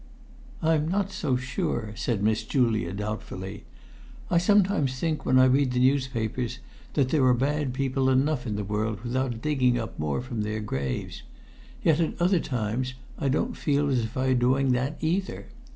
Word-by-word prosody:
"I'm 160 Hz, -1 st, +2 dB
not 195 Hz, +3 st, 0 dB
so 135 Hz, -8 st, 0 dB
sure," 125 Hz, -3 st, -2 dB
said 110 Hz, -3 st, -1 dB
Miss 110 Hz, +1 st, +2 dB
Julia, 110 Hz, -8 st, +1 dB
doubtfully. 100 Hz, -1 st, -5 dB, 0.7 s
"I 170 Hz, -, +5 dB
sometimes 185 Hz, -7 st, +3 dB
think, 155 Hz, +2 st, -2 dB
when 130 Hz, -, +4 dB
I 130 Hz, -, +7 dB
read 130 Hz, 0 st, +3 dB
the 125 Hz, -, +1 dB
newspapers, 125 Hz, -3 st, 0 dB, 0.4 s
that 135 Hz, -2 st, +2 dB
there 150 Hz, -2 st, +2 dB
are 125 Hz, -1 st, +5 dB
bad 140 Hz, +2 st, 0 dB
people 130 Hz, 0 st, 0 dB
enough 130 Hz, 0 st, +1 dB
in 105 Hz, -, -2 dB
the 105 Hz, -, -2 dB
world 105 Hz, +1 st, -2 dB
without 120 Hz, -1 st, -2 dB
digging 130 Hz, -5 st, +2 dB
up 115 Hz, -1 st, -5 dB
more 75 Hz, -2 st, -1 dB
from 120 Hz, -3 st, -4 dB
their 105 Hz, +1 st, -2 dB
graves. 70 Hz, -11 st, -3 dB, 0.6 s
Yet 160 Hz, -1 st, +4 dB
at 165 Hz, +1 st, -1 dB
other 180 Hz, +1 st, +3 dB
times 125 Hz, 0 st, -2 dB, 0.2 s
I 140 Hz, -, 0 dB
don't 135 Hz, -, 0 dB
feel 145 Hz, -1 st, +1 dB
as 130 Hz, -, +2 dB
if 115 Hz, +4 st, -4 dB
I 130 Hz, 0 st, +1 dB
were -, -, +4 dB
doing 130 Hz, +2 st, +2 dB
that 130 Hz, +5 st, 0 dB
either. 180 Hz, +5 st, -1 dB
130 Hz, 175 wpm, -26 LUFS, 110-145 Hz, 0.7 s, I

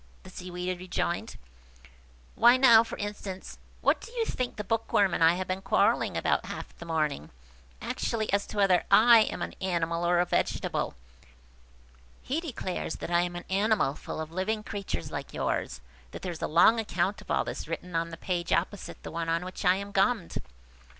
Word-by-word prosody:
the 185 Hz, -, -12 dB
Seaweed 180 Hz, 0 st, -5 dB
rejoined. 175 Hz, -1 st, -3 dB, 1.0 s
"Why 240 Hz, +2 st, +6 dB
now, 235 Hz, -4 st, +7 dB
for 230 Hz, -, -7 dB
instance, 205 Hz, -2 st, -6 dB, 0.2 s
what -, -, +2 dB
do -, -, -10 dB
you 465 Hz, -2 st, 0 dB
think 255 Hz, -, -3 dB
the 210 Hz, -, -4 dB
Bookworm 205 Hz, -3 st, +1 dB
and -, -, +2 dB
I 165 Hz, +1 st, +6 dB
have 185 Hz, 0 st, -3 dB
been 185 Hz, +1 st, -2 dB
quarrelling 195 Hz, -, +2 dB
about -, -, 0 dB
half -, -, -7 dB
the 170 Hz, -, -9 dB
morning? 155 Hz, -, -1 dB, 0.5 s
Actually 220 Hz, -3 st, -2 dB
as 200 Hz, 0 st, +1 dB
to 215 Hz, -, -8 dB
whether 195 Hz, -3 st, +4 dB
I 235 Hz, +1 st, +8 dB
am 215 Hz, -, 0 dB
an -, -, -5 dB
animal 170 Hz, -2 st, -1 dB
or 175 Hz, 0 st, +3 dB
a 175 Hz, -, +3 dB
vegetable. -, -, -1 dB, 1.3 s
He 290 Hz, +6 st, -1 dB
declares 225 Hz, -, -4 dB
that -, -, -6 dB
I 170 Hz, 0 st, +4 dB
am 175 Hz, 0 st, -3 dB
an 175 Hz, -, -6 dB
animal 200 Hz, -6 st, +2 dB
full -, -, -7 dB
of 160 Hz, 0 st, -4 dB
little 170 Hz, -, -11 dB
living 210 Hz, +3 st, -1 dB
creatures 195 Hz, -, -5 dB
like -, -, -6 dB
yours, -, -, -1 dB, 0.3 s
and 60 Hz, -, -28 dB
that -, -, -8 dB
there 180 Hz, -, -2 dB
is 165 Hz, -, -8 dB
a -, -, 0 dB
long 180 Hz, +8 st, +5 dB
account 200 Hz, -2 st, -1 dB
of -, -, -17 dB
all -, -, +2 dB
this -, -, -6 dB
written 170 Hz, +2 st, -5 dB
on 165 Hz, 0 st, 0 dB
the 165 Hz, -, -8 dB
page 175 Hz, 0 st, -3 dB
opposite 185 Hz, +3 st, -1 dB
the -, -, -7 dB
one 165 Hz, 0 st, -3 dB
on 165 Hz, +2 st, 0 dB
which 185 Hz, -, -7 dB
I 180 Hz, +1 st, +5 dB
am 200 Hz, +1 st, -5 dB
gummed!" 200 Hz, -1 st, +1 dB
185 Hz, 195 wpm, -28 LUFS, 170-210 Hz, 1.3 s, I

